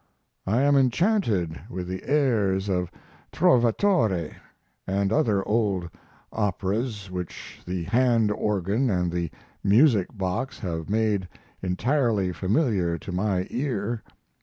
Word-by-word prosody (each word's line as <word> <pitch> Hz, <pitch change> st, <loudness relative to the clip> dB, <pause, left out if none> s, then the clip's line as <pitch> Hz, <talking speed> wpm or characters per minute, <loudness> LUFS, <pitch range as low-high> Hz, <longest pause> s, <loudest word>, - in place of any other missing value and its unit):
I 115 Hz, +7 st, +2 dB
am 145 Hz, 0 st, +4 dB
enchanted 130 Hz, -, +2 dB
with 90 Hz, -1 st, -5 dB
the 95 Hz, 0 st, -4 dB
airs 105 Hz, -9 st, +2 dB
of 90 Hz, -2 st, 0 dB, 0.4 s
"Trovatore" 115 Hz, -, +2 dB, 0.5 s
and 100 Hz, +2 st, 0 dB
other 105 Hz, -4 st, +1 dB
old 100 Hz, -6 st, 0 dB, 0.4 s
operas 105 Hz, 0 st, -2 dB
which 90 Hz, -2 st, -7 dB
the 90 Hz, -1 st, -2 dB
hand 115 Hz, +2 st, +2 dB
organ 105 Hz, +4 st, 0 dB
and 90 Hz, -3 st, 0 dB
the 85 Hz, -1 st, -2 dB, 0.3 s
music 105 Hz, -, +4 dB
box 95 Hz, +8 st, -2 dB
have 85 Hz, -5 st, -4 dB
made 105 Hz, -3 st, +1 dB, 0.3 s
entirely 105 Hz, 0 st, +1 dB
familiar 95 Hz, -, +1 dB
to 90 Hz, -, -8 dB
my 95 Hz, 0 st, 0 dB
ear. 120 Hz, -4 st, -2 dB
100 Hz, 110 wpm, -25 LUFS, 90-120 Hz, 0.5 s, am